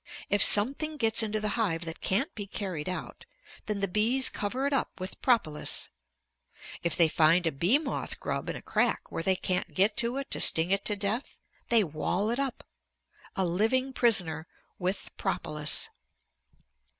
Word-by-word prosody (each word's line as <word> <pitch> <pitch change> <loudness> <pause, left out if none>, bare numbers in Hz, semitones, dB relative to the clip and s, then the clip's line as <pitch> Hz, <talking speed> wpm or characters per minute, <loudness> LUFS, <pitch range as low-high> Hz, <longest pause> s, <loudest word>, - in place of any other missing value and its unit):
If 205 - +2
something 280 +9 +6
gets 225 -4 +2
into 215 -1 -2
the 210 0 -2
hive 170 -5 -1
that 165 0 -8
can't 265 - 0
be 205 -2 -6
carried 185 -6 -5
out, 185 - -7 0.4
then 210 -2 -3
the 200 - 0
bees 225 +7 +2
cover 245 +7 -3
it 285 - -1
up 270 - -2
with 185 +1 -8
propolis. 210 - +1 0.9
If 170 - 0
they 170 - +5
find 165 +3 +3
a 165 - +1
bee 175 - +2
moth 300 -3 -4
grub - - -4
in - - -4
a - - -9
crack - - -1
where - - -4
they 190 +3 +1
can't 180 0 -3
get 200 +3 +3
to 235 +2 0
it 275 - -6
to - - -1
sting 165 +3 +4
it 200 0 +1
to 210 - +4
death, 205 +6 -4 0.3
they 230 -2 +5
wall 180 +6 -2
it 240 - -2
up, 275 -2 -3 0.7
a 190 - 0
living 225 +10 0
prisoner, 175 -11 +1 0.3
with 185 +2 -4
propolis. 150 -1 0
205 Hz, 175 wpm, -28 LUFS, 175-235 Hz, 0.9 s, something